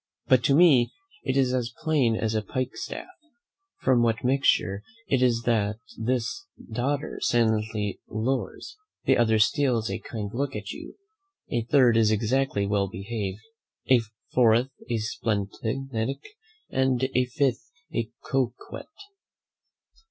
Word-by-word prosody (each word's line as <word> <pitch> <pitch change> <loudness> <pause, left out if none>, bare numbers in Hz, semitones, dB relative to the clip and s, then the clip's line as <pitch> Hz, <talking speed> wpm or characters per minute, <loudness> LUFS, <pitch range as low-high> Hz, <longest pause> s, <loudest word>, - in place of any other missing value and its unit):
But 130 -2 +4
to 140 - +4
me 145 -8 +6 0.3
it 135 +1 0
is 130 -2 +3
as 125 -2 -1
plain 145 -8 +2
as 110 0 -1
a 110 - +1
pikestaff, 130 +5 -4 0.8
from 130 -2 +4
what 115 -1 +1
mixture 125 -7 +2 0.3
it 135 -2 +2
is 120 -2 +2
that 110 -3 +1 0.2
this 125 - -2 0.3
daughter 140 +5 -2
silently 110 -3 +1
lours, 130 - -3 0.3
the 135 - +5
other 110 -2 +3
steals 115 0 +2
a - - -3
kind 105 -3 -6
look 135 +1 -2
at 105 0 -5
you, - - -9 0.6
a 120 -1 0
third 120 -3 +5
is 110 -2 +4
exactly 110 0 +1
well 100 -1 +1
behaved, 100 +1 -5 0.5
a 130 - +8 0.3
fourth 120 +1 +4 0.2
a 120 - +1
splenetic, 110 - -3 0.4
and 130 -1 +2
a 125 0 +3
fifth 125 +1 -1 0.2
a 115 -2 -1 0.2
coquette. 130 -2 -2
120 Hz, 130 wpm, -26 LUFS, 110-130 Hz, 0.8 s, a